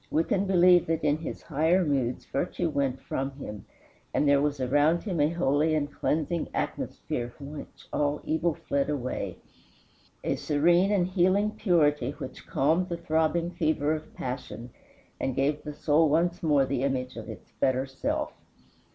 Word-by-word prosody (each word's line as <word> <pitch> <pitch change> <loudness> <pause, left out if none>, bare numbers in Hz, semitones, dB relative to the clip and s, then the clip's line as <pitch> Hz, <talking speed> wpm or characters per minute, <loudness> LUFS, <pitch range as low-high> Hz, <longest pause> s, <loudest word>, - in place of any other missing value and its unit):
We 160 - +2
can 195 +3 0
believe 180 -2 +5
that 165 -1 -1
in 150 0 +3
his 160 - -6
higher 165 +4 +2
moods 130 -4 -1
virtue 170 +3 -1
went 135 -2 0
from 135 +1 -2
him, 105 -7 -8 0.5
and 150 - +3
there 140 0 +5
was 145 -1 0
around 145 +6 +2
him 185 -7 -2
a 145 +1 +4
holy 155 -2 +2
and 145 -1 -1
cleansing 160 +2 -1
atmosphere 120 0 -3
from 140 +3 -10
which - - -10
all 145 0 +1
evil 160 0 0
fled 140 0 -1
away, 130 -4 -3 0.9
a - - 0
serene 175 +6 +3
and 195 -4 +3
healing 185 +3 +2
purity 150 - +2
which 130 - -9
calmed 165 +7 +1
the 170 - -2
throbbing 165 +1 0
fever 155 -3 +1
of 155 0 -6
passion 125 -2 -6 0.5
and 130 - -1
gave 145 +2 +1
the 150 - -6
soul 150 +1 +3
once 170 +3 +1
more 145 -4 +3
the 130 -1 -2
image 130 -2 -1
of - - -8
its - - -10
better 130 0 +2
self. 135 0 -3
150 Hz, 165 wpm, -28 LUFS, 140-170 Hz, 0.9 s, believe